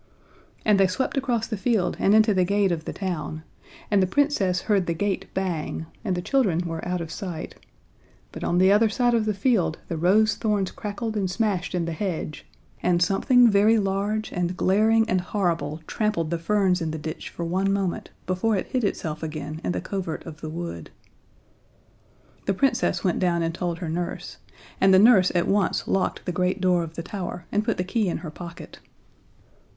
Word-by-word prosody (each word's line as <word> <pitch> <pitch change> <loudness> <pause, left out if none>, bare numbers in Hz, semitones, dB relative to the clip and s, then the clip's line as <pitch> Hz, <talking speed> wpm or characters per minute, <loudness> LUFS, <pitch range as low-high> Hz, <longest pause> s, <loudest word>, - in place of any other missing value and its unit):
And 210 -2 +4
they 195 - +5
swept 225 +8 -2
across 245 -5 0
the 220 - -3
field 215 -2 0
and 200 - +4
into 215 -1 +5
the 185 -1 +3
gate 200 +1 +2
of 160 -2 -3
the - - -3
town, 160 -5 -4 0.5
and 200 -2 +4
the 185 - +2
Princess 195 -7 +1
heard 200 -5 +1
the 170 - 0
gate 195 +1 -1
bang, 175 -4 -2 0.2
and 190 -5 -1
the 175 - -3
children 205 -11 +2
were 165 -1 -4
out 180 -1 -1
of 165 - -6
sight 180 -6 -6 0.8
but - - -8
on 175 - +1
the 190 +2 +5
other 215 +2 +5
side 240 +3 +1
of 225 -2 +2
the 215 - +1
field 195 -8 +1
the 165 - -2
rose 205 +6 +4
thorns 210 -4 0
crackled 220 +1 -4
and 195 -3 0
smashed 190 -3 -1
in 175 -2 0
the 170 - -3
hedge, 160 -3 -4 0.3
and 175 -1 +2
something 240 +6 +4
very 210 +3 +5
large 205 +2 -1
and 180 0 -2
glaring 220 +4 +3
and 185 0 +1
horrible 165 -5 -1
trampled 190 -7 -1
the 170 - -1
ferns 190 0 +1
in 165 - -1
the 160 - -4
ditch 155 +1 -6
for 170 - -5
one 190 +3 0
moment 195 -3 -2 0.2
before 185 +5 +1
it 190 - -1
hid 255 -2 0
itself 160 -6 -2
again 155 -1 -5
in 90 - -1
the 90 0 -2
covert 185 - -4
of 160 -1 -10
the 155 - -5
wood. 160 - -6 1.6
The 195 - +1
Princess 255 +3 +1
went 180 -3 +1
down 175 -2 +1
and 165 0 -1
told 175 -1 -3
her 175 -1 -5
nurse, 170 +2 -4 0.4
and 190 0 +6
the - - +7
nurse 195 -3 +6
at 175 - +2
once 200 -2 +1
locked 195 - -1
the 180 - -1
great 180 +2 0
door 180 -2 +3
of 165 -1 -6
the 170 - -5
tower 180 -2 -6
and 210 +1 +1
put 225 0 -1
the 180 - 0
key 200 +1 0
in - - -1
her 155 - -5
pocket. 170 +1 -10
185 Hz, 200 wpm, -25 LUFS, 170-210 Hz, 1.6 s, the